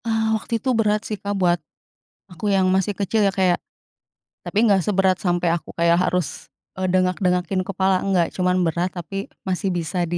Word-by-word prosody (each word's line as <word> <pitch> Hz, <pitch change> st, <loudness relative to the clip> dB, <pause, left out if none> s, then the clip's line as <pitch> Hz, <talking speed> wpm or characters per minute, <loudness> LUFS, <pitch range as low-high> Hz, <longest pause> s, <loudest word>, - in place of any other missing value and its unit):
Ah, 220 Hz, -1 st, +1 dB
waktu 220 Hz, -, -8 dB
itu 260 Hz, +4 st, -3 dB
berat 210 Hz, -1 st, +2 dB
sih, 215 Hz, -, -3 dB
Kak, 200 Hz, 0 st, -2 dB
buat 175 Hz, -1 st, +3 dB, 0.7 s
aku 180 Hz, +4 st, -7 dB
yang 190 Hz, -1 st, +3 dB
masih 190 Hz, +2 st, +1 dB
kecil 210 Hz, +2 st, +1 dB
ya, -, -, +2 dB
kayak 185 Hz, -2 st, +3 dB, 0.9 s
tapi -, -, -5 dB
nggak 200 Hz, -4 st, +4 dB
seberat 190 Hz, -3 st, +2 dB
sampai 175 Hz, 0 st, +1 dB
aku 170 Hz, -, -7 dB
kayak 170 Hz, 0 st, +4 dB
harus, 180 Hz, -4 st, 0 dB, 0.5 s
eee, 185 Hz, -, 0 dB
dengak 185 Hz, 0 st, +2 dB
dengakin 180 Hz, +1 st, +1 dB
kepala, 190 Hz, 0 st, +1 dB
enggak, 185 Hz, -3 st, +2 dB
cuman 180 Hz, 0 st, +1 dB
berat 170 Hz, +3 st, 0 dB
tapi 175 Hz, +3 st, -7 dB, 0.3 s
masih 190 Hz, +1 st, -1 dB
bisa 170 Hz, +1 st, -3 dB
di 175 Hz, -, 0 dB
185 Hz, 185 wpm, -22 LUFS, 175-200 Hz, 0.9 s, nggak